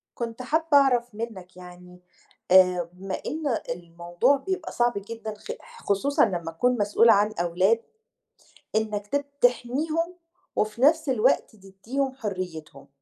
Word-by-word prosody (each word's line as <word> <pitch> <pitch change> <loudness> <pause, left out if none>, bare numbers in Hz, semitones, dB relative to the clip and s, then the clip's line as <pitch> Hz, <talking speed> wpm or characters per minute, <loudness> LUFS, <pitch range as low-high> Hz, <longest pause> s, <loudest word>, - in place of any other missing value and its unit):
كنت 235 0 -5
حابة 315 +6 0
أعرف 245 -4 +2
منك 195 -5 -7
يعني، 180 0 -13 0.5
آآ 180 -2 +5
بما 190 +1 -7
إن 315 +1 -5 0.3
الموضوع 175 +8 0
بيبقى 375 +6 -4
صعب 240 0 +1
جدًا 220 +2 -6
خِ 210 - -8 0.3
خُصوصًا 270 +9 +2
لمّا 175 -5 -3
تكون 245 +9 +1
مسؤول 210 +2 +4
عن 210 0 +4
أولاد، 180 +6 +2 1.0
إنك 210 -2 -1
ت 285 +6 -1 0.2
تحميهم 305 +8 +1 0.4
وفي 215 +3 -1
نفس 310 +2 +4
الوقت 225 -3 +2
تديهم 215 +8 -4
حريتهم. 180 - -6
215 Hz, 125 wpm, -25 LUFS, 180-255 Hz, 1.0 s, آآ